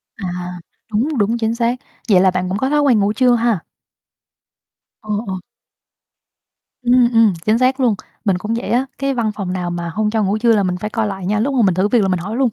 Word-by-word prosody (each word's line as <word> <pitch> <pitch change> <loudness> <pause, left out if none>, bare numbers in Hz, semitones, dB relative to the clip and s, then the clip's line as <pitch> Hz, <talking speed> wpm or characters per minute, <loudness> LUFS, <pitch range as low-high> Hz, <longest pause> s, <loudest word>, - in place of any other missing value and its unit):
À, 190 -4 -5 0.6
đúng, 255 +7 0
đúng, 220 +3 +1
chính 225 0 -1
xác. 235 +1 +1 0.3
Vậy 185 -3 +6
là 190 -1 +4
bạn 180 0 -2
cũng 190 - -1
có 265 +5 0
thói 295 0 +2
quen 255 -6 +4
ngủ 200 +1 +1
trưa 250 0 +3
ha? 230 -6 0 1.4
Ồ, 215 - -15 0.2
ồ. 190 -1 -3 1.4
Ừm, 245 0 +4
ừm, 225 -3 +5
chính 215 +1 +3
xác 255 +2 +2
luôn, 235 -5 +2 0.3
mình 195 -3 +2
cũng 215 +5 -3
vậy 235 - -3
á. 250 +3 +2
Cái 275 0 -1
văn 230 -4 0
phòng 190 -3 -3
nào 180 -1 -3
mà 170 -1 -4
hông 210 +5 -1
cho 220 -1 0
ngủ 200 +2 0
trưa 230 0 +3
là 205 - +2
mình 180 -1 -1
phải 210 +4 -4
coi 220 0 -1
lại 195 -2 -5
nha, 210 +3 0
lúc 270 +5 0
mà 255 - +2
mình 185 - +3
thử 190 +3 +1
việc 230 0 +3
là 195 - +1
mình 185 -2 0
hỏi 205 +6 -5
luôn 265 -2 +3
215 Hz, 240 wpm, -18 LUFS, 195-240 Hz, 1.4 s, Vậy